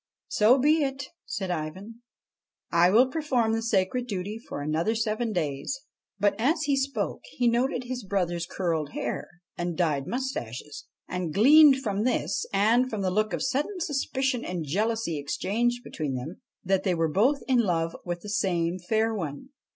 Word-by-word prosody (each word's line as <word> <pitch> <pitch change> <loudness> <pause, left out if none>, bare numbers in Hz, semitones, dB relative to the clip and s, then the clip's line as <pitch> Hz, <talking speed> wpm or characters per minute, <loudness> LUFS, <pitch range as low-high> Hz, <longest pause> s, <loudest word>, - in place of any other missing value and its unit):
' - - -66
So 245 - +5
be 300 +4 +3
it/ 270 -1 -2 0.2
said 190 -3 -3
Ivan; 185 +8 -5 0.4
' - - -66 0.3
I 170 +1 +5
will 230 +7 +6
perform 255 -7 +1
the 225 - 0
sacred 225 +3 0
duty 205 +1 -4
for 225 - -7
another 160 +9 0
seven 220 +1 -1
days.' 155 - -2 0.4
But 205 -1 +3
as 305 +7 +2
he 285 -2 +2
spoke, 275 +1 -2
he 245 - +1
noted 245 +2 +1
his 250 -1 -5
brothers' 175 -3 -1
curled 165 -6 -2
hair - - -3 0.3
and 175 -1 -2
dyed 150 -6 0
moustaches, 150 - -5 0.2
and 180 -3 -3
gleaned 275 - +7
from 205 -1 -1
this, 255 +3 0
and 225 +6 +3
from 215 -4 -3
the 185 - +1
look 215 +2 +1
of - - -2
sudden 285 +9 -1
suspicion 270 -5 -1
and 175 -3 -4
jealousy 210 0 -1
exchanged 235 +11 -1
between 150 - -4
them, 130 +8 -6 0.2
that 190 0 +2
they 185 -3 +1
were 165 -1 +1
both 235 - +2
in 255 -2 +3
love 165 -6 0
with 175 -1 -4
the 210 - -8
same 185 -4 0
fair 220 +5 0
one. 165 - -5
210 Hz, 175 wpm, -27 LUFS, 175-250 Hz, 0.4 s, gleaned